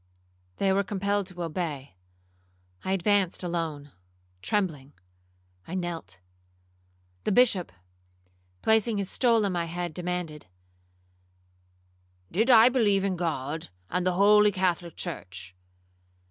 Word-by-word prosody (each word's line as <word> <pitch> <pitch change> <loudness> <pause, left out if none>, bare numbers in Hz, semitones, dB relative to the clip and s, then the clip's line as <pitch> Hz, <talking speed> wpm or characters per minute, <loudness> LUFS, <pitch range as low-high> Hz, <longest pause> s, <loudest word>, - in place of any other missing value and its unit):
They 195 -1 +2
were 200 +1 +2
compelled 200 0 -1
to 180 -2 -6
obey. 155 - -4 0.9
I 190 - -1
advanced 195 -1 +1
alone, 160 -5 -3 0.5
trembling. 150 - -2 0.7
I 180 - -5
knelt. 165 - -5 1.0
The - - 0
Bishop, 205 -5 +3 0.9
placing 220 0 +3
his 200 -1 -2
stole 230 -4 +3
on 200 - 0
my 175 -2 -1
head, 175 0 -4
demanded, 180 - -4 1.8
'Did 220 +8 +1
I 230 -2 +8
believe 215 -6 +2
in 195 -2 0
God, 155 - -3 0.2
and 180 +1 0
the 185 0 +1
holy 210 +2 +5
Catholic 180 -3 -1
church?' 95 - -7
180 Hz, 110 wpm, -27 LUFS, 165-200 Hz, 1.8 s, I